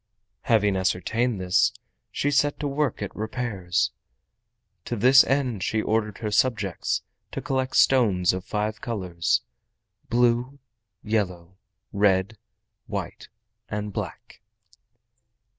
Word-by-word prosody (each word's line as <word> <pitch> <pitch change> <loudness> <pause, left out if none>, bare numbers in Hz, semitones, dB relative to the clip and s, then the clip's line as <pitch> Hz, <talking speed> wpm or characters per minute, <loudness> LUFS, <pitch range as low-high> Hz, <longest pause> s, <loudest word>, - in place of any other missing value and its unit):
Having 105 -4 +3
ascertained 110 +5 0
this, 95 +5 +3 0.4
she 145 - -1
set 145 +1 +2
to 145 - -2
work 140 -6 -1
at 100 - -6
repairs. 110 -5 -1 0.9
To 120 - -3
this 130 +5 +7
end 130 -7 0
she 110 - 0
ordered 110 -1 0
her 110 -2 -4
subjects 105 -6 0 0.3
to - - -4
collect 130 -2 -2
stones 100 -10 +4
of 95 0 -4
five 105 +2 -3
colors—blue, 120 +5 -2 0.5
yellow, 95 -5 -2 0.4
red, 100 +1 +2 0.5
white - - -5 0.4
and 105 -1 -4
black. - - -7
110 Hz, 105 wpm, -25 LUFS, 95-125 Hz, 0.9 s, this